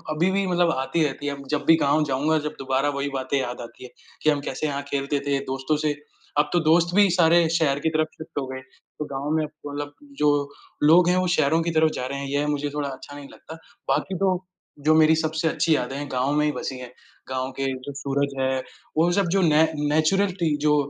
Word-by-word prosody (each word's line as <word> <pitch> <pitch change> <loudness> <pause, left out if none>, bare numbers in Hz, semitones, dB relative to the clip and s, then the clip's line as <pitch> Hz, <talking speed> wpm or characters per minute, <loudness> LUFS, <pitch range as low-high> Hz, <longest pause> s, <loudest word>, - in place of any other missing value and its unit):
अभी 175 +5 +2
भी 195 0 +1
मतलब 175 -2 +2
आती 135 +5 0
रहती 145 0 -4
है, 145 - -1
अब 140 -1 -12
जब 145 -1 -4
भी 165 - +8
गाँव 150 +2 +3
जाऊँगा 150 +4 +2
जब 150 - -7
दोबारा 135 +1 0
वही 140 +1 -1
बातें 130 +1 -1
याद 125 -2 -4
आती 120 +2 -11
है। 125 - -9 0.3
कि 155 - +4
हम 145 -2 +1
कैसे 155 - -2
यहाँ 140 -1 -3
खेलते 140 +1 -1
थे 140 -1 +1
दोस्तों 135 +3 -1
से 150 - +2 0.4
अब 150 0 +3
तो 175 - +4
दोस्त 170 +1 +4
भी 205 -2 +6
सारे 170 -1 +4
शहर 155 -4 +1
की - - +4
तरफ 155 0 +1
शिफ्ट 160 -2 -6
हो 135 - -3
गए, 130 0 -6
तो 130 +3 -11
गाँव 140 0 -4
में 155 - +1
अब 150 - -5
तो 150 -1 -10
मतलब 145 0 -5 0.3
जो 150 - +4 0.5
लोग 170 +3 +6
हैं 180 - +3
वो 185 0 +1
शहरों 155 +3 +3
की 170 0 -1
तरफ 160 0 +5
जा 125 - -3
रहे 140 +1 -4
हैं, 140 - -4
यह 145 +2 0
मुझे 145 0 -1
थोड़ा 145 -1 -2
अच्छा 135 +2 -10
नहीं 145 -1 -9
लगता। 160 - -11 0.3
बाकी 190 - 0
तो 185 0 0 0.4
जो 155 - +7
मेरी 160 0 +6
सबसे 160 0 -1
अच्छी 160 +1 +2
यादें 130 0 -2
हैं 145 0 -5
गाँव 130 +2 0
में 150 0 +2
ही 150 - +2
बसी 135 - -5
है, 125 - -7 0.4
गाँव 130 0 -2
के 135 - 0 0.2
जो 140 - -6
सूरज 140 0 -1
हैं, 130 0 0 0.4
वो 170 +2 +4
जब 195 0 +1
जो 195 - +3
ने 155 -2 +5 0.3
नेचुरलटी 170 +1 +1
जो 150 - +5
150 Hz, 240 wpm, -24 LUFS, 140-160 Hz, 0.5 s, भी